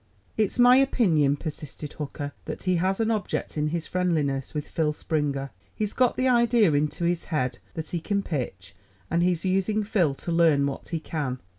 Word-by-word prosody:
"It's 215 0 0
my 245 +1 +7
opinion," 165 - +3
persisted 150 -1 -7
Hooker, 145 -1 -5
"that - - -6
he 185 -1 +2
has 190 +4 0
an 225 0 +2
object 210 -4 -2
in 150 0 0
his 165 +1 -2
friendliness 155 -7 -1
with 150 - -3
Phil 155 -2 0
Springer. 145 -3 -2 0.2
He's 210 -1 -2
got 250 -2 +2
the 255 - +2
idea 235 -6 +4
into 150 +4 0
his 170 0 0
head 150 -7 -1 0.2
that 160 -2 -5
he 175 - -2
can 200 +4 -1
pitch, 125 - -4 0.4
and 170 +1 +2
he's 175 0 +1
using 195 +3 +1
Phil 180 -9 +1
to 170 - -5
learn 165 -4 +4
what 140 -1 -4
he 165 - -2
can. 145 -5 -3
165 Hz, 185 wpm, -26 LUFS, 150-200 Hz, 0.4 s, my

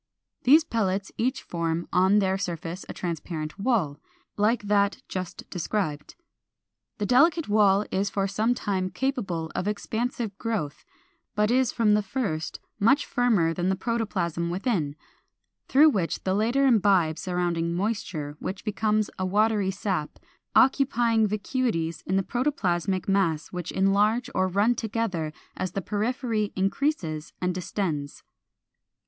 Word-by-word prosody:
These 300 +5 +7
pellets 200 - -1
each 255 +4 0
form 170 0 -2
on 190 +3 +4
their 190 -2 +2
surface 175 -2 -4
a - - -3
transparent 165 -1 -5
wall, 195 - 0 0.4
like 215 +2 +2
that 205 +4 +1
just 185 -2 -6
described. 170 -5 -3 0.8
The 210 - -1
delicate 310 - +4
wall 205 -1 +4
is 195 +2 0
for 195 -1 0
some 215 +5 +1
time 190 -5 -1
capable 190 - -2
of 190 - -2
expansive 220 +1 -2
growth, 210 -11 -3 0.5
but 210 +1 +2
is 255 0 +3
from 215 -3 +3
the 210 - +3
first 190 -8 -3 0.2
much 265 +8 +4
firmer 215 -10 +2
than 175 +2 -1
the 190 - +2
protoplasm 190 -6 -2
within; 175 - -1 0.7
through 295 0 +6
it 165 - -2
the 190 - 0
latter 235 +7 +2
imbibes 195 - +3
surrounding 175 -2 -1
moisture, 180 -7 -2
which 190 +2 -5
becomes 215 0 0
a 185 - 0
watery 210 0 +2
sap, 185 -5 -2 0.4
occupying 240 -5 +4
vacuities 210 -5 -1
in 190 - +1
the 195 - +2
protoplasmic 195 - -1
mass 180 -6 +1
which 180 -1 -5
enlarge 210 +6 +2
or 185 0 +2
run 200 +6 +2
together 220 -9 -2 0.2
as 185 -1 -3
the 195 - -2
periphery 220 0 -1
increases 190 - -1
and 180 0 0
distends. 170 -5 -3
200 Hz, 135 wpm, -26 LUFS, 175-225 Hz, 0.8 s, These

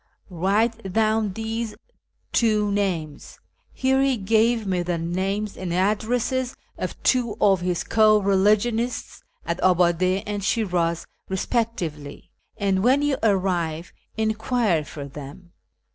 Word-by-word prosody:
Write 200 +4 0
down 220 -1 +2
these 225 +1 -4 0.6
two 215 -3 +2
names 175 -8 -3 0.3
(here 265 +1 +1
he 270 -2 +2
gave 225 +2 +2
me 185 -2 0
the 175 -1 -1
names 190 +5 -2
and 185 -2 -5
addresses 230 +7 0 0.2
of - - -5
two 245 -4 +1
of 195 -3 +4
his 180 -1 -1
co 215 -1 +4
religionists 210 +4 +1 0.2
at 170 +1 -2
Abade 185 +1 +2
and 205 -1 -3
Shi'raz 175 -6 0 0.2
respectively), 185 - -3 0.3
and 195 -1 +1
when 265 +4 +4
you 290 -2 +1
arrive 180 -5 0 0.2
enquire 220 -5 +1
for 145 -1 -8
them. 145 +5 -11
200 Hz, 115 wpm, -24 LUFS, 180-225 Hz, 0.6 s, of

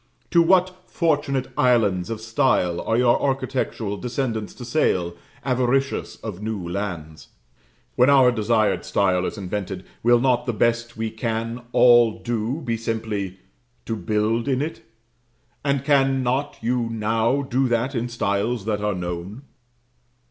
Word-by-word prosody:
to 170 - +6
what 185 +1 +2
fortunate 145 -5 0
islands 105 -8 +2
of 115 -1 -4
style 110 -6 +1
are 115 - 0
your 120 -1 +3
architectural 130 -6 -2
descendants 120 -2 -3
to 125 - -10
sail, 90 - 0 0.3
avaricious 130 +1 0
of 105 -4 -6
new 105 -5 -4
lands? 85 -5 -5 0.7
When 125 +2 +5
our 135 -3 +6
desired 110 -1 +1
style 90 -2 +1
is - - -6
invented, 95 -1 -4 0.2
will 120 +1 +4
not 125 0 +1
the 120 - 0
best 120 +1 0
we 110 0 -2
can 115 +1 -3
all 120 -3 +5
do 120 +5 -2
be 115 -5 -2
simply 110 -4 -3 0.5
to 115 - -2
build 110 +4 0
in 130 -2 +1
it? 155 +4 -4 0.8
and 140 -1 0
cannot 135 -1 +1
you 120 0 0
now 115 +4 0
do 130 0 0
that 120 +3 0
in 120 -1 -2
styles 105 0 -1
that 105 -2 -1
are 105 -2 0
known? 90 +7 -5
115 Hz, 140 wpm, -23 LUFS, 105-130 Hz, 0.8 s, to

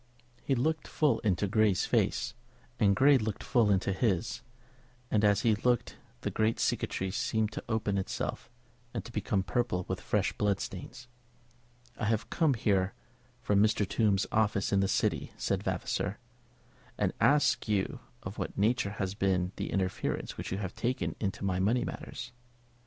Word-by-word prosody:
He 135 - +1
looked 155 +5 0
full 150 -2 +2
into 100 -2 +1
Grey's 105 -1 +3
face, 115 0 +1 0.5
and 100 -3 +4
Grey 140 0 +6
looked 110 -2 -3
full 120 -5 +3
into 95 0 +2
his; 95 -4 0 0.7
and 105 -1 +3
as 105 0 +4
he 115 - +4
looked 120 +3 0 0.2
the - - -2
great 110 +1 +1
cicatrice 95 +1 -1
seemed 110 -1 0
to - - -6
open 105 -3 0
itself 95 - -4 0.5
and - - -3
to - - -9
become 105 -3 0
purple 100 -4 -1
with - - -3
fresh - - 0
blood 100 -2 +1
stains. 120 +6 -7 0.9
"I 110 - -1
have 110 -1 0
come 155 -6 +3
here 100 -4 +1 0.5
from 100 -1 +3
Mr. 105 -2 +3
Tombe's 100 -2 +2
office 105 -2 +1
in 100 - +4
the 95 - +2
City," - - 0
said - - 0
Vavasor, - - -2 0.8
"to - - +1
ask 145 -4 +4
you 100 -3 0 0.2
of - - -6
what - - -4
nature 105 -1 +1
has 95 -2 -1
been 95 -3 +1
the - - -3
interference 95 -2 -2
which - - -6
you 95 - -1
have 95 -3 -4
taken 125 +2 -2
in 100 -3 0
my 95 -2 0
money 110 +6 +2
matters?" 125 0 -6
105 Hz, 165 wpm, -30 LUFS, 95-115 Hz, 0.9 s, Grey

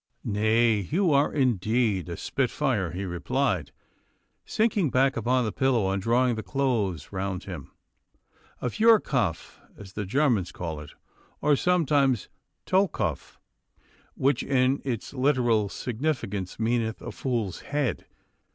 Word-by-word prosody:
'Nay, 110 +1 +2
you 175 +2 +2
are 140 +1 +3
indeed 110 - +1
a 85 - -5
spitfire,' 125 - -1
he 95 +4 -4
replied, 95 - -1 0.7
sinking 215 -7 +1
back 135 +1 +2
upon 125 +2 +1
the 110 - -1
pillow, 120 -8 +1
and 95 0 -1
drawing 120 +4 +2
the 110 - -3
clothes 110 - -1
round 95 -1 -3
him, 85 -9 -8 0.9
'a 125 - +1
feuerkopf 210 - +2 0.2
as 95 -2 -11
the 105 - -3
Germans 110 -4 +1
call 80 -5 -5
it, 75 0 -11 0.5
or 150 0 +3
sometimes 140 - +2 0.4
tollkopf, 190 +1 0 0.8
which 140 +2 +1
in 135 0 +1
its 125 -3 -4
literal 125 -6 +2
significance 115 - -3
meaneth 115 -1 0
a - - -5
fool's 115 -8 -2
head. 140 -7 -2
120 Hz, 125 wpm, -26 LUFS, 100-135 Hz, 0.9 s, are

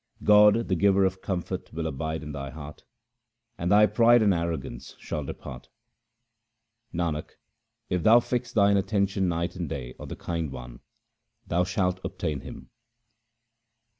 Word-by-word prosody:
God, 105 +2 +6
the - - 0
giver 100 +1 +3
of 95 0 -2
comfort, 90 -3 -4
will 80 0 -4
abide 80 +1 -3
in 75 - -6
thy 70 -1 -5
heart, 75 +1 -10 0.7
and 90 -3 -2
thy 105 +1 +7
pride 115 +3 +5
and 100 -2 +4
arrogance 85 -8 -4
shall 75 - -4
depart. 65 -2 -9 1.2
Nanak, 85 -3 -3 0.5
if 90 -1 -1
thou 110 +7 +7
fix 120 0 -3
thine 100 -3 +4
attention 100 -1 0
night 85 +1 -2
and 85 -4 -4
day 65 -2 -5
on - - -8
the - - -6
Kind 85 -4 -4
One, - - -9 0.7
thou 90 +1 +1
shalt 90 0 -1
obtain 90 -6 -3
Him. - - -11
90 Hz, 145 wpm, -26 LUFS, 80-100 Hz, 1.2 s, thy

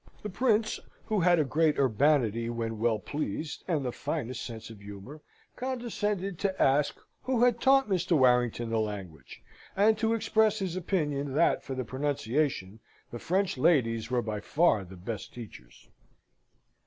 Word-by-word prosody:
The 210 - -4
Prince 220 0 +1 0.3
(who 215 -2 0
had 175 0 +4
a 155 - +3
great 150 +2 +1
urbanity 120 -3 +2
when 115 -2 -3
well 115 -1 +2
pleased, 150 +5 -4
and 155 -7 0
the 125 - -1
finest 125 -3 -4
sense 115 -1 -8
of 110 - -12
humour) 100 +9 -10 0.3
condescended 210 -7 -3
to 195 -2 -1
ask 140 +2 +2 0.2
who 255 -2 +1
had 240 -1 +3
taught 270 -1 +5
Mr. 180 -4 +1
Warrington 125 -3 +2
the 115 - +1
language; 95 -10 -6 0.3
and 215 +3 +4
to 225 0 +2
express 220 -1 +2
his 190 -4 -3
opinion, 150 -7 -1
that, 170 - +3
for 135 - -5
the 130 -1 -3
pronunciation, 130 -5 -1 0.3
the 120 - -6
French 185 -2 0
ladies 115 -7 +2
were 125 -1 0
by 105 -1 -3
far 145 - +2
the 95 0 -12
best 100 +4 -6
teachers. - - -12
140 Hz, 155 wpm, -29 LUFS, 115-190 Hz, 0.3 s, taught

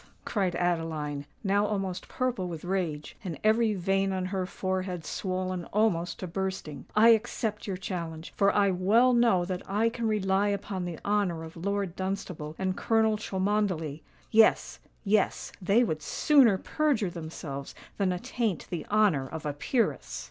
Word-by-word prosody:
cried 190 -5 0
Adeline, 160 -5 -1 0.2
now 200 0 +2
almost 195 -3 -2
purple 250 -8 -1
with 165 -3 -6
rage, 175 -6 -2
and 175 -5 -4
every 220 0 +3
vein 195 +1 +1
on 185 -1 -1
her 185 -1 -2
forehead 185 -3 -3
swollen 185 -2 -3
almost 195 -5 +1
to - - -5
bursting. 185 -4 -4
"I 220 +2 +7
accept 220 -1 +1
your 190 -2 -2
challenge—for 180 +1 -1
I 200 -1 +3
well 215 +8 +4
know 230 -7 +4
that 180 0 -3
I 215 +4 +2
can 230 -1 -3
rely 200 -1 +2
upon 200 -2 -2
the 170 -2 -5
honour 200 -5 +1
of 160 0 -10
Lord 200 +1 -2
Dunstable 185 -5 -4
and 190 -1 -1
Colonel 220 0 +2
Cholmondeley. 190 -7 -1 0.3
Yes—yes: 215 -2 +2
they 200 +6 +4
would 155 -9 -2
sooner 250 - +4
perjure 265 - 0
themselves 155 -4 -7 0.2
than 195 -2 +1
attaint 190 +2 -2
the 170 -4 -4
honour 205 -11 +3
of 160 +2 -7
a 145 - -1
peeress!" 230 - -1
190 Hz, 150 wpm, -28 LUFS, 175-210 Hz, 0.3 s, I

